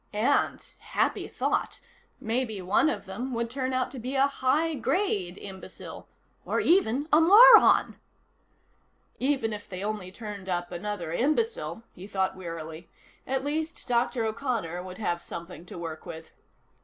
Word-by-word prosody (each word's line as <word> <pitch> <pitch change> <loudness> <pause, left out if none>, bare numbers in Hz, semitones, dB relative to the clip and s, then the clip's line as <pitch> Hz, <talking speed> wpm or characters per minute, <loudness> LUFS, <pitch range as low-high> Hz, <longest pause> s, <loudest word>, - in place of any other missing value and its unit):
And 220 +7 +1
happy - - -1
thought! - - -1 0.4
maybe 225 -2 -1
one 190 - +3
of - - -4
them 240 +7 -5
would 235 0 -2
turn 260 0 -2
out 255 0 0
to 265 - -7
be 255 +4 -4
a 270 +1 +5
high 280 +4 +1
grade 245 - 0
imbecile, 190 -2 -9 0.4
or - - -1
even 300 - +3
a 310 - +7
moron. 440 +7 +8 1.2
Even 260 -5 +1
if 205 -1 -8
they 185 0 -5
only 205 -3 -3
turned 205 -2 -8
up 175 -1 -2
another 175 -2 -4
imbecile, 305 - 0
he 185 +3 -10
thought 190 -2 -1
wearily, 165 -2 -7 0.4
at 265 0 -1
least 315 +3 -3
Dr. 240 -1 +1
O'Connor 220 -7 -2
would 185 0 -8
have 175 -5 -1
something 170 +1 -8
to - - -9
work 165 -2 -6
with. 160 -1 -9
220 Hz, 145 wpm, -27 LUFS, 185-270 Hz, 1.2 s, moron